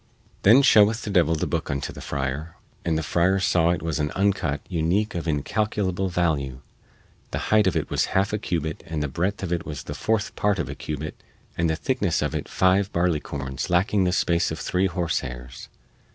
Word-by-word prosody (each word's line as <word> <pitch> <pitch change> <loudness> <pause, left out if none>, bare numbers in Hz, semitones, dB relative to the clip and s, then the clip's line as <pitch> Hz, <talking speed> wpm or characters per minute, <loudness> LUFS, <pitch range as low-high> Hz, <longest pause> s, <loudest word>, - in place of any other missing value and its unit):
Then 120 +8 +7
shewed 110 -4 +6
the 105 -2 -5
devil 85 -4 +3
the 75 - -1
booke - - -2
unto 70 -1 -3
the - - -9
friar, 70 +4 -3 0.3
and 80 -2 0
the 80 - -1
friar 85 +7 +2
saw 90 -2 +3
it 90 - 0
was 80 -2 -1
an 75 0 0
uncut 95 -7 0
unique 90 +5 0
of 85 -1 -4
incalculable 95 +4 -1
value; 75 -8 -1 0.7
the - - -3 0.2
height 105 -3 +5
of 95 - +1
it - - -2
was - - +2
half 100 +2 +1
a 105 - 0
cubit 80 -5 -3
and 80 -2 -2
the - - 0
breadth 90 +8 -2
of 90 -2 -1
it 85 - -1
the 75 -4 -6
fourth 110 -2 -1
part 105 -1 +1
of - - -2
a - - -4
cubit 75 0 -6 0.3
and 85 -1 +1
the 80 - +1
thickness 100 - 0
of 75 - -2
it - - -4
five 95 +2 +2
barleycorns 75 -5 -2
lacking 95 +2 +2
the 90 - +2
space 85 -1 +1
of 80 - -4
three 90 +3 0
horsehairs. 65 -9 -4
85 Hz, 195 wpm, -24 LUFS, 75-95 Hz, 0.7 s, Then